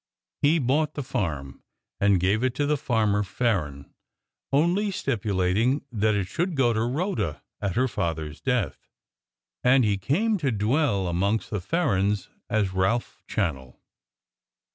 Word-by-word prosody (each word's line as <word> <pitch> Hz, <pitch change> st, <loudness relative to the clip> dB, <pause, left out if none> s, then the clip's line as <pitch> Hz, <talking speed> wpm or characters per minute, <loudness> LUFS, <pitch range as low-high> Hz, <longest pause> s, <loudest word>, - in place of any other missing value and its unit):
He 150 Hz, +4 st, +4 dB
bought 150 Hz, +3 st, +1 dB
the 145 Hz, -, -3 dB
farm, 80 Hz, -, -3 dB, 0.4 s
and 100 Hz, -2 st, +4 dB
gave 100 Hz, +6 st, +1 dB
it 130 Hz, -1 st, 0 dB
to 145 Hz, +2 st, +1 dB
Farmer 110 Hz, -7 st, +1 dB
Farren; 95 Hz, -, -2 dB, 0.6 s
only 175 Hz, +9 st, +2 dB
stipulating 115 Hz, -, 0 dB
that 110 Hz, -1 st, +1 dB
it 100 Hz, -2 st, 0 dB
should 170 Hz, -, -2 dB
go 125 Hz, -4 st, +3 dB
to 110 Hz, -, 0 dB
Rhoda 130 Hz, -, -2 dB, 0.2 s
at 100 Hz, -2 st, -1 dB
her 130 Hz, +3 st, +3 dB
father's 80 Hz, -, -3 dB
death. 125 Hz, -5 st, -1 dB, 0.7 s
And 125 Hz, 0 st, +5 dB
he 100 Hz, -2 st, +1 dB
came 200 Hz, -, +1 dB
to 140 Hz, -5 st, 0 dB
dwell 110 Hz, -1 st, +1 dB
amongst 100 Hz, +6 st, 0 dB
the 105 Hz, -, -2 dB
Farrens 105 Hz, -, 0 dB, 0.2 s
as 100 Hz, -4 st, +1 dB
Ralph 95 Hz, +6 st, 0 dB
Channell. 70 Hz, -, -2 dB
110 Hz, 135 wpm, -26 LUFS, 95-135 Hz, 0.7 s, And